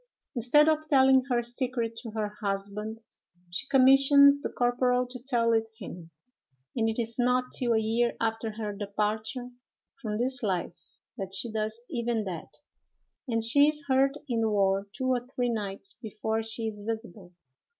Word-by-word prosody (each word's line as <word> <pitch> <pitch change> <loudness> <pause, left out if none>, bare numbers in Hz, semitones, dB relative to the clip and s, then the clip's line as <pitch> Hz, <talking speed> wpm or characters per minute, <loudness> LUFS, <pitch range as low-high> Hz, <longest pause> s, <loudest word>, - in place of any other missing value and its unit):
Instead 265 +5 +4
of 310 0 +1
telling 265 -2 +5
her 240 -1 +1
secret 240 -1 -2
to 230 - -7
her 215 -1 -2
husband, 205 +2 -4 0.5
she 175 - -3
commissions 275 +2 +6
the - - -3
corporal 250 +1 +1
to 250 +1 -9
tell 240 -3 +1
it 225 0 +1
him, 175 -6 -9 0.7
and 225 -2 +1
it 225 - -3
is 230 +1 -3
not 250 +1 +2
till 240 -2 +1
a - - +3
year 230 +2 +1
after 225 -1 -2
her 210 -1 -4
departure 215 +5 -3 0.5
from 210 -4 -3
this 255 +2 0
life 185 -6 -1 0.5
that 190 0 -4
she 230 +4 -3
does 215 +1 -2
even 235 -5 -1
that; 180 -5 -6 0.8
and 230 -2 0
she 285 +6 +5
is 300 -1 0
heard 270 +1 +3
in 235 -3 0
the 220 - +2
ward 195 -1 +1
two 260 +4 -5
or 255 -2 +1
three 245 -1 +1
nights 215 - -4
before 220 0 -2
she 225 +1 -5
is 210 -2 -4
visible. 205 -4 -6
230 Hz, 165 wpm, -28 LUFS, 215-255 Hz, 0.8 s, commissions